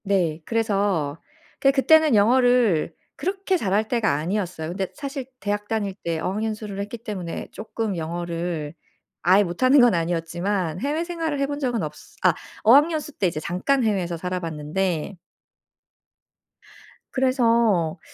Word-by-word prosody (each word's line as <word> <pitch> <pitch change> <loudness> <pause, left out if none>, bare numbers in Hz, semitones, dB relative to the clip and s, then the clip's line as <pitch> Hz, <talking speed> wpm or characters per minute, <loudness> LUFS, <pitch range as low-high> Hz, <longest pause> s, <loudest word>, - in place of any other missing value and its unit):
네. 175 -6 0
그래서 200 -9 0 0.4
그게 275 - +5
그때는 305 0 +5
영어를 230 -6 +3 0.2
그렇게 385 +1 -1
잘할 210 - +1
때가 225 - +1
아니었어요. 170 0 -2
근데 190 +2 -2
사실 275 -2 -5
대학 205 0 -2
다닐 210 -3 -1
때 165 -1 -1
어학연수를 210 +2 -3
했기 205 +4 -4
때문에 195 -7 -6
쪼끔 220 -1 -4
영어를 170 -2 -3 0.5
아예 190 +4 +5
못하는 255 +10 +3
건 245 -3 +6
아니었지만 170 +1 -1
해외 295 +5 0
생활을 330 -4 -3
해 275 - +2
본 285 +1 -4
적은 245 - -1
없으 150 -1 -8
아 - - +5 0.3
어학연수 300 +5 +4
때 190 - +3
이제 165 -3 -3
잠깐 190 - 0
해외에서 185 -6 0
살아 180 +2 -3
봤는데 165 +2 -2 2.0
그래서 230 - +2
205 Hz, 305 characters per minute, -24 LUFS, 170-245 Hz, 2.0 s, 건